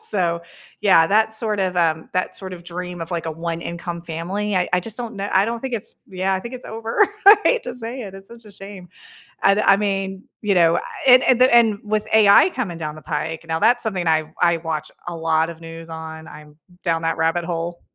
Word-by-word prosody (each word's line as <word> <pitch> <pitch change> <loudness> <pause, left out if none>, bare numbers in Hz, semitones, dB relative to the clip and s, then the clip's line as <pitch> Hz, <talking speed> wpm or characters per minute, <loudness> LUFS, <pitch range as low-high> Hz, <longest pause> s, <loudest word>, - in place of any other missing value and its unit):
So, 170 -4 0 0.4
yeah, 185 -6 +5
that 220 +3 +2
sort 220 -1 -1
of, 185 -1 -1
um, 160 -2 +1
that 185 - -1
sort 190 -1 -7
of 175 -1 -9
dream 180 0 -6
of, 165 - -6
like, 170 -2 -3
a - - -2
one 165 +1 -4
income 170 0 -5
family. 180 +5 -3
I 180 - +1
I 180 - +2
just 220 +3 -7
don't 235 -2 -5
know 200 +1 -3
I 190 +1 +4
don't 230 0 -3
think 265 0 -5
it's 225 -4 -4
Yeah, 190 +1 -1
I 190 - -2
think 235 +5 -8
it's 255 - -9
over. 225 - -5 0.3
I 410 +2 +11
hate - - +3
to 245 - -5
say 245 +2 -6
it, 195 -3 -8
it's 195 0 -12
such 235 0 -14
a 210 - -14
shame. 195 -2 -11 0.6
I 195 - +5
do 210 - +1
I 195 - +5
mean 195 -1 -2 0.2
you 205 -2 +1
know, 170 -1 +4 0.3
and 255 -1 +8
and 250 -1 +3
the 255 -1 +6
and 225 -3 +5
with 215 0 -1
AI 215 - +7
coming 195 - -4
down 155 -2 -5
the 155 - -11
pike, 160 +2 -4
now 160 0 -1
that's 240 +5 +3
something 190 -6 -2
I 155 -1 +1
I 170 -1 +4
watch 160 -2 -4 0.2
a 175 - -6
lot 160 0 +1
of 165 - -9
news 165 0 -10
on. 160 0 -8
I'm 150 0 -13 0.3
down 165 -2 0
that 165 0 -1
rabbit 165 +2 +1
hole. 170 0 -4
185 Hz, 235 wpm, -21 LUFS, 165-215 Hz, 0.6 s, I